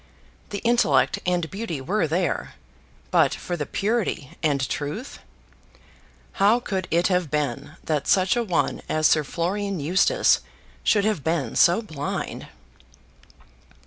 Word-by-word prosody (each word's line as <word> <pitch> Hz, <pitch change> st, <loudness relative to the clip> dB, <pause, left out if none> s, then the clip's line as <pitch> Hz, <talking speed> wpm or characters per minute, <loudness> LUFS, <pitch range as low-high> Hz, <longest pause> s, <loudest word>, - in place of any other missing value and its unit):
The 200 Hz, -, -5 dB
intellect 145 Hz, -, +3 dB
and 175 Hz, -2 st, +1 dB
beauty 195 Hz, -7 st, -4 dB
were 170 Hz, +6 st, 0 dB
there; 175 Hz, +3 st, -1 dB, 0.6 s
but, -, -, +3 dB
for 175 Hz, -, -4 dB
the 150 Hz, -4 st, -4 dB
purity 205 Hz, -, -1 dB
and 140 Hz, -4 st, +1 dB
truth; 150 Hz, -, -5 dB, 1.2 s
how 210 Hz, +5 st, +5 dB
could 190 Hz, -6 st, -3 dB
it 170 Hz, +2 st, +2 dB
have 180 Hz, -4 st, +1 dB
been 140 Hz, -2 st, -2 dB
that 150 Hz, -3 st, -1 dB
such 190 Hz, +2 st, +3 dB
a 240 Hz, -, +1 dB
one 180 Hz, -6 st, -1 dB
as 155 Hz, 0 st, 0 dB
Sir 155 Hz, 0 st, +4 dB
Florian 190 Hz, +5 st, -2 dB
Eustace 190 Hz, -, +3 dB, 0.4 s
should 205 Hz, -2 st, +3 dB
have 215 Hz, -10 st, 0 dB
been 160 Hz, -8 st, -1 dB
so 185 Hz, +5 st, +4 dB
blind! 145 Hz, -7 st, -5 dB
175 Hz, 130 wpm, -24 LUFS, 150-200 Hz, 1.2 s, how